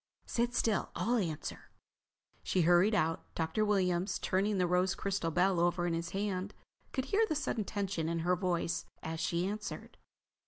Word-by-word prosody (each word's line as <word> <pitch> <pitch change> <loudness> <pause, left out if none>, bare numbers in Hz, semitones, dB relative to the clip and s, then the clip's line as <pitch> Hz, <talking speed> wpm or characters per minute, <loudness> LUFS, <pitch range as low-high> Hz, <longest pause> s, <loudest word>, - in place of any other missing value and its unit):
"Sit 240 +1 0
still, 220 -3 +1
I'll 240 +2 +1
answer." 165 -8 -3 0.7
She 185 - +1
hurried 175 +6 +5
out. 165 -4 0
Dr. 160 +6 0
Williams, 190 -3 +1
turning 200 +2 +1
the 180 - +3
rose 180 +1 +2
crystal 195 -4 -1
bell 180 +2 +2
over 175 0 +2
in 175 - 0
his 165 0 -2
hand, 195 0 -2 0.4
could 260 - -2
hear 405 +10 +3
the 310 - -1
sudden 235 -7 -1
tension 195 -6 -2
in 170 - -1
her 180 +1 +3
voice 175 -2 -1 0.2
as 160 0 -4
she 170 +2 0
answered. 210 +1 -6
185 Hz, 165 wpm, -33 LUFS, 170-210 Hz, 0.7 s, hurried